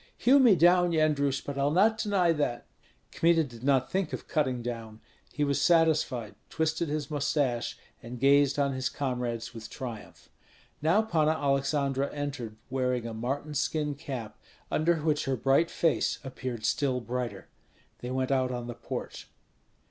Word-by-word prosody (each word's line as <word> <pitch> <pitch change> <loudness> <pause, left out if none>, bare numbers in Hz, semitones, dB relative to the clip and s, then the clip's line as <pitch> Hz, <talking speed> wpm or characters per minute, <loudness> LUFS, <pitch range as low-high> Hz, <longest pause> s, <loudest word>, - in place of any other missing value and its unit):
"Hew 270 +3 +5
me 240 -7 +6
down, 175 +1 +4
Yendrus, 145 -4 +1
but 140 -1 -4
I'll 140 +1 +2
not 210 +8 +3
deny 195 -5 +2
that." 145 -6 -2 0.5
Kmita 165 -1 +3
did 120 -5 -11
not 135 -2 +2
think 190 -4 -1
of - - -6
cutting 130 -6 0
down; 115 -2 -6 0.3
he 150 - -1
was 140 -1 +1
satisfied, 155 -9 +2 0.2
twisted 160 0 -1
his 150 -1 -3
mustache, 140 -4 -1 0.2
and 120 +1 -8
gazed 140 +1 +4
on 140 -1 +1
his 130 0 -1
comrades 120 -4 -3
with 110 -2 -9
triumph. 120 -5 -8 0.5
Now 170 +8 +3
Panna 160 -7 +2
Aleksandra 140 -1 0
entered, 135 -7 -4 0.2
wearing 125 -2 0
a 115 - -5
marten 135 +7 -3
skin 150 0 -1
cap, 135 -6 -7 0.3
under 170 +2 +2
which 155 -1 0
her 135 - 0
bright 135 +7 +3
face 165 -2 +1
appeared 130 -4 -5
still 135 -4 +1
brighter. 120 -4 -4 0.5
They 125 - -6
went 130 +1 -1
out 130 -1 +2
on 120 -1 -4
the 120 - -5
porch. 120 - -7
140 Hz, 155 wpm, -28 LUFS, 125-155 Hz, 0.5 s, me